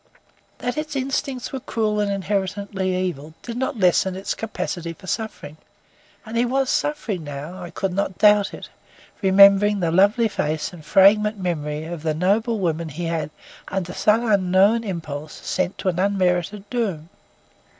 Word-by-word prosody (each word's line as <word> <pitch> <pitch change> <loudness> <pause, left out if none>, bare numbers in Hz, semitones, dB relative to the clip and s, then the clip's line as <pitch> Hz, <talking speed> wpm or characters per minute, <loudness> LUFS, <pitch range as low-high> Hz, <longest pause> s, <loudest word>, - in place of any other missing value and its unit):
That 245 +5 -3
its 305 -1 -5
instincts 265 -1 -2
were 265 - -2
cruel 215 -4 -1
and 205 -1 0
inherently 195 -1 -2
evil, 155 -3 -6
did 235 - -6
not 260 +1 -2
lessen 185 -1 +3
its 190 +1 -3
capacity 175 -6 -4
for 165 - -16
suffering. 185 -7 -5 0.7
And 220 +1 -7
he 235 - +3
was 260 +2 +1
suffering 230 - -1
now; 150 +5 -7
I 175 - -7
could 185 +2 -3
not 190 -1 -2
doubt 210 -1 +5
it, - - -9 0.5
remembering 200 +1 +6
the 170 -3 0
lovely 205 +6 +4
face 155 -5 -2
and 165 -3 -11
fragrant 210 +5 +4
memory 155 -5 -3
of 170 -1 -6
the 155 -1 -1
noble 215 +7 +1
woman 170 -4 -1
he 165 +4 -5
had, 165 -3 -2 0.4
under 185 -2 -3
some 220 +3 +2
unknown 200 +2 +3
impulse, 155 -6 -5
sent 185 0 -2
to 190 - -1
an 175 -1 -2
unmerited 195 +1 0
doom. 195 -10 -2
195 Hz, 160 wpm, -22 LUFS, 170-215 Hz, 0.7 s, remembering